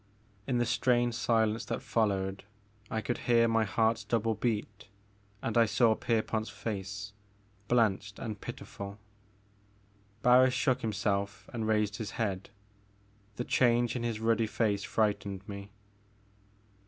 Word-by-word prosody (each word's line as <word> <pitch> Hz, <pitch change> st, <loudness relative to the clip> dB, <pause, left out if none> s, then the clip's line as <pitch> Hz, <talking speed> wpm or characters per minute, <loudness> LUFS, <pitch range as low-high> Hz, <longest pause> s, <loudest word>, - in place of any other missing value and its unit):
In 130 Hz, -2 st, +1 dB
the 120 Hz, -, +2 dB
strained 120 Hz, 0 st, +2 dB
silence 115 Hz, -1 st, +1 dB
that -, -, -2 dB
followed 100 Hz, -3 st, 0 dB, 0.5 s
I 110 Hz, -, -1 dB
could 120 Hz, -, -2 dB
hear 115 Hz, -1 st, +5 dB
my 115 Hz, -1 st, +2 dB
heart's 110 Hz, +2 st, +1 dB
double 115 Hz, -1 st, +1 dB
beat 105 Hz, -2 st, -3 dB, 0.6 s
and 115 Hz, -, -2 dB
I 115 Hz, -1 st, +5 dB
saw 110 Hz, +2 st, +4 dB
Pierpont's 110 Hz, -1 st, -1 dB
face, 100 Hz, -1 st, -5 dB, 0.5 s
blanched 105 Hz, -4 st, +1 dB
and 105 Hz, -2 st, -5 dB
pitiful. 100 Hz, 0 st, -7 dB, 1.3 s
Barris 125 Hz, +1 st, +6 dB
shook 130 Hz, -1 st, +1 dB
himself 100 Hz, -1 st, -1 dB
and 115 Hz, -2 st, -2 dB
raised 105 Hz, -1 st, +1 dB
his 110 Hz, -, -5 dB
head. 100 Hz, -4 st, -2 dB, 0.9 s
The 120 Hz, -, -3 dB
change 120 Hz, -1 st, +3 dB
in 120 Hz, -, -2 dB
his 115 Hz, -2 st, -2 dB
ruddy 115 Hz, 0 st, +2 dB
face 105 Hz, -2 st, 0 dB
frightened 100 Hz, -3 st, -1 dB
me. 100 Hz, -1 st, -7 dB
110 Hz, 130 wpm, -31 LUFS, 105-115 Hz, 1.3 s, Barris